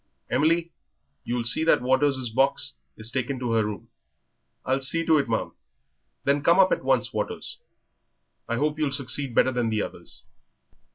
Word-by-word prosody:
"Emily, 165 +3 +2 0.5
you'll 120 0 -2
see 120 +7 +3
that 160 - +3
Waters' 130 -1 +1
box 130 - +1 0.2
is 110 +2 -4
taken 130 +1 -2
to 125 -2 -3
her 115 -1 +2
room." 105 -1 -6 0.8
"I'll 135 +1 0
see 165 +5 +1
to 160 -2 +4
it, 135 - -2
ma'am." 110 - -1 0.7
"Then 140 +1 +2
come 170 +5 +4
up 190 -1 +5
at - - 0
once, - - +1
Waters. - - -4 0.9
I 115 - 0
hope 150 +4 -1
you'll 150 -3 0
succeed 135 -1 -2
better 130 - +4
than 120 -2 -1
the 110 -2 0
others." - - -10
135 Hz, 165 wpm, -25 LUFS, 120-150 Hz, 0.9 s, up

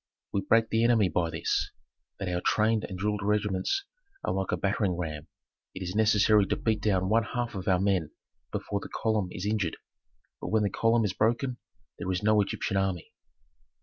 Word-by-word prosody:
We 100 - +1
break 115 +3 +2
the 115 +1 +2
enemy 115 -5 +4
by 85 0 0
this, - - -1 0.5
that 95 - -4
our 90 0 -1
trained 110 +2 +2
and 95 - -5
drilled 105 +1 -1
regiments 105 - 0 0.4
are - - 0
like 95 -1 -1
a - - +1
battering 100 -2 0
ram: 80 -3 -5 0.5
it 95 - -5
is 90 0 -4
necessary 105 -1 +4
to - - 0
beat 110 -2 0
down 95 -3 +1
one 110 +3 +4
half 120 +2 -3
of 95 -3 -6
our 95 -2 +4
men 95 -5 +1 0.4
before 100 - -2
the - - -9
column 110 -4 0
is 90 - -6
injured. 105 -6 -1 0.6
But - - -4
when 110 -1 +2
the 100 - 0
column 115 +1 +2
is 95 - -1
broken, 120 +5 0 0.4
there 95 - -4
is 90 +2 -2
no 105 0 +4
Egyptian 100 0 -2
army." 95 -3 -2
100 Hz, 190 wpm, -28 LUFS, 95-110 Hz, 0.6 s, enemy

